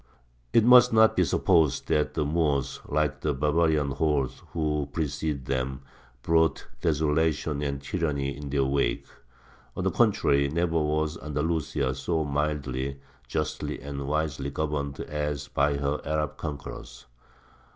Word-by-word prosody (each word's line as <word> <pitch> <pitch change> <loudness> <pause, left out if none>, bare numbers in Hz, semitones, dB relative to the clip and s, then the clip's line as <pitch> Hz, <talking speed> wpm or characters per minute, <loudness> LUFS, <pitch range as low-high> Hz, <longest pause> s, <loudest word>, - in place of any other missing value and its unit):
It 115 - +5
must 125 0 +8
not 110 0 +5
be - - +4
supposed 80 -7 +2
that 75 -1 +1
the 75 - 0
Moors, 75 -3 0
like 70 -2 0
the 75 -2 0
barbarian 75 0 +2
hordes 70 -2 0
who 75 -3 -1
preceded 75 -2 -2
them, 65 0 -2 0.4
brought 80 -3 +2 0.2
desolation 75 -1 +1
and 70 -1 -2
tyranny 70 -2 -2
in 70 0 -7
their 70 0 +1
wake. 70 +1 0 0.7
On - - -2
the - - +1
contrary, 70 0 +3
never 85 +1 +1
was 75 +1 -1
Andalusia 75 -3 -1
so 80 +3 -1
mildly, 70 -2 -2 0.3
justly, 75 +4 -3
and 70 0 -6
wisely 75 -2 -1
governed 70 -1 -3
as 75 -1 -3
by 70 0 +1
her 70 +1 -1
Arab 75 -1 -1
conquerors. 75 -2 -7
75 Hz, 130 wpm, -27 LUFS, 70-80 Hz, 0.7 s, must